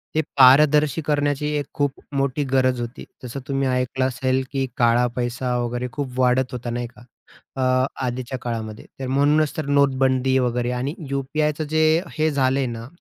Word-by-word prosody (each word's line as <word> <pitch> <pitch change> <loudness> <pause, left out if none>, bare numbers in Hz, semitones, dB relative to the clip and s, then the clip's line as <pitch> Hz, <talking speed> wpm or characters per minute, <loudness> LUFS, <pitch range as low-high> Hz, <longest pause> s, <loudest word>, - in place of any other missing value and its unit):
ते 155 - +3 0.2
पारदर्शी 150 +3 +6
करण्याची 145 -1 0
एक 145 - -2
खूप 145 -1 0 0.2
मोठी 140 +1 0
गरज 130 -2 +2
होती. 120 +1 -7 0.2
जसं 125 +3 -6
तुम्ही 135 -1 0
ऐकलं 125 +1 0
असेल, 130 +1 0
की 135 -1 -1
काळा 120 0 +3
पैसा 125 0 -2
वगैरे 120 +1 -2
खूप 130 -4 -4
वाढत 125 0 +2
होता, 125 -1 -5
नाही 120 0 -3
का? 120 - -18 0.6
अ, 130 0 +2 0.2
आधीच्या 125 +1 -4
काळामध्ये. 110 -3 -5
तर 135 - -4
म्हणूनच 145 +3 +2
तर 155 - -2
नोटबंदी 135 -2 +2
वगैरे 125 -1 0
आणि 135 +5 -2 0.2
UPI 145 +3 0
चं 155 - -2
जे 155 0 +2 0.3
हे 155 +1 +2
झालंय 135 -1 +1
ना, 115 0 -6
130 Hz, 165 wpm, -22 LUFS, 125-140 Hz, 0.6 s, पारदर्शी